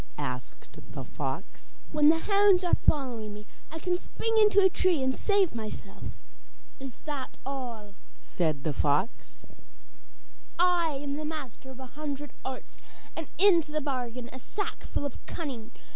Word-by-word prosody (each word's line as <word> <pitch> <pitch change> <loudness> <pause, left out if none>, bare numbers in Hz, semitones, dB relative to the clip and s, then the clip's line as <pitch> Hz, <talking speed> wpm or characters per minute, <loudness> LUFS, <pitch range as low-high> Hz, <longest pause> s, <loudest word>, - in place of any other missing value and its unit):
asked 125 -4 -5 0.2
the - - -4
fox. - - -5
'When 300 -1 +6
the 325 - +6
hounds 400 0 +5
are 355 - 0
following 235 -8 +2
me, 210 0 -9 0.3
I 320 - -4
can 355 +2 0
spring 450 +4 -1
into 420 -1 +7
a 385 - +8
tree 360 -5 +2
and 260 0 +2
save 400 -4 +3
myself.' 220 -2 -6 0.6
'Is 270 -3 -8
that 285 -4 -4
all?' 240 -7 -5 0.3
said 155 -5 0
the 155 - 0
fox. 150 - 0 1.1
'I 350 -1 +4 0.2
am 290 +2 -2
master 275 -5 -6
of 265 0 -10
a 260 - -7
hundred 290 0 -5
arts, 260 -1 -6 0.4
and 325 -3 -4
have 395 +5 +4
into 335 -6 +5
the 305 - +1
bargain 250 -4 -3
a 260 - -7
sackful 400 - -3
of 280 - -5
cunning. 260 -9 -4
285 Hz, 150 wpm, -29 LUFS, 240-340 Hz, 1.1 s, a